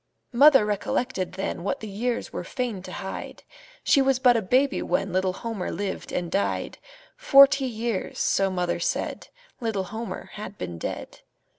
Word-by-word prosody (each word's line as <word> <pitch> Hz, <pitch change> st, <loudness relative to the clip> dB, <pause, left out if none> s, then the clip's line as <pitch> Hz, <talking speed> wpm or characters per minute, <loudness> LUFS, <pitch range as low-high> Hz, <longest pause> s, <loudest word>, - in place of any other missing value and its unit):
Mother 270 Hz, -2 st, +7 dB
recollected 205 Hz, 0 st, -2 dB
then 185 Hz, -2 st, -4 dB
What 200 Hz, -, -2 dB
the 220 Hz, -, -7 dB
years 230 Hz, +4 st, -3 dB
were -, -, -4 dB
fain 240 Hz, -7 st, -3 dB
to -, -, -9 dB
hide 190 Hz, -1 st, -7 dB, 0.4 s
She 275 Hz, -, +4 dB
was 270 Hz, -1 st, +3 dB
but 250 Hz, -2 st, +5 dB
a 230 Hz, -, +2 dB
baby 260 Hz, +8 st, +2 dB
when 195 Hz, -2 st, -1 dB
Little 185 Hz, 0 st, +1 dB
Homer 225 Hz, -2 st, -4 dB
lived 200 Hz, -1 st, -4 dB
and 175 Hz, -1 st, -3 dB
died; 200 Hz, -, -1 dB, 0.4 s
Forty 275 Hz, -1 st, +6 dB
years, 230 Hz, -4 st, -3 dB
so 195 Hz, 0 st, +2 dB
mother 180 Hz, -2 st, -1 dB
said, -, -, -2 dB, 0.3 s
Little 220 Hz, -5 st, -1 dB
Homer 225 Hz, +1 st, -6 dB
had 205 Hz, -1 st, -8 dB
been 85 Hz, -2 st, -6 dB
dead. -, -, -6 dB
210 Hz, 160 wpm, -25 LUFS, 190-250 Hz, 0.4 s, Mother